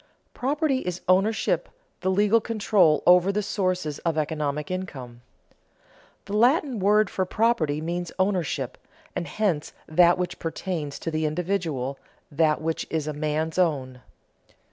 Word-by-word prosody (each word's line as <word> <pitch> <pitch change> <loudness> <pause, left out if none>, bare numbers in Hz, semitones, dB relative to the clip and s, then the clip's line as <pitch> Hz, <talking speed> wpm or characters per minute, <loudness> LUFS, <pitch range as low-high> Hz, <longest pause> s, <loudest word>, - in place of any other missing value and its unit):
Property 285 +1 0
is 180 -6 -4
ownership, 195 +4 +2 0.3
the 185 - -1
legal 205 +4 +3
control 205 -9 +2
over 180 +2 +6
the 210 +1 -1
sources 185 -7 -1
of 165 -2 -1
economic 150 0 -2
income. 130 -10 -6 1.0
The 200 - -4
Latin 250 +2 +3
word 210 +2 +4 0.2
property 165 -10 +1
means 175 +1 -3
ownership, 175 -9 -1 0.4
and 170 - -3
hence 185 -8 -1
that 175 +2 +5
which 180 0 -3
pertains 165 -3 -4
to 165 - -4
the 155 0 0
individual, 155 -6 -2 0.3
that 155 +1 +2
which 160 0 -2
is 160 -2 -1
a 155 - -3
man's 155 +3 -2
own. 130 -7 0
175 Hz, 130 wpm, -25 LUFS, 150-200 Hz, 1.0 s, over